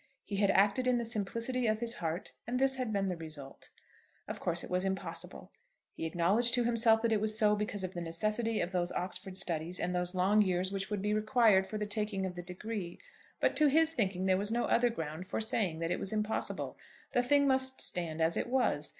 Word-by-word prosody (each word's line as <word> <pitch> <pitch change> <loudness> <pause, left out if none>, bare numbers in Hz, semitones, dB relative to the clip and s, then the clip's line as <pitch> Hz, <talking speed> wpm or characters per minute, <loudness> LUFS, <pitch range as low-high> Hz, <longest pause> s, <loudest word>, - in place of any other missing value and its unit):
He 200 - -4
had 200 0 +3
acted 205 +6 +3
in 250 -1 +3
the 235 - -2
simplicity 230 +3 -1
of 215 0 +1
his 235 0 0
heart, 165 +2 -3 0.2
and 245 +1 -1
this 265 0 +2
had 250 -4 -2
been 200 -2 0
the 185 -2 -1
result. 155 -4 -9 0.6
Of - - -5
course 170 0 -1
it - - -8
was 180 +1 +1
impossible. 190 0 -4 0.4
He 165 - -4
acknowledged 200 +9 +2
to 245 - +2
himself 230 -1 +3
that 230 - +2
it 215 -2 +2
was 215 0 +1
so, 210 -1 +4
because 205 -1 -3
of 185 0 -4
the 175 - -5
necessity 215 +7 0
of 175 - -2
those 175 -1 0
Oxford 185 +1 -4
studies 170 0 -1
and 180 - -1
those 180 +1 -2
long 195 +4 +4
years 185 -1 0
which 195 0 -3
would 205 -2 -3
be 210 0 +1
required 215 -3 +3
for 215 - -4
the 210 - -2
taking 210 -2 -1
of 185 - -4
the 175 - -6
degree. 180 0 -6 0.4
But - - +2
to 305 - +5
his 320 +3 +4
thinking 190 - -1
there 190 -1 +3
was 205 +2 0
no 240 +1 +1
other 240 +1 +3
ground 160 -3 -5
for - - -2
saying 215 -6 -1
that 165 +1 -1
it - - -1
was 190 - -3
impossible. 215 0 -3 0.3
The 245 - +3
thing 285 +3 +3
must 260 0 +4
stand 165 -2 -2
as 165 +1 +2
it - - -1
was. 240 - +2
205 Hz, 225 wpm, -32 LUFS, 180-230 Hz, 0.6 s, to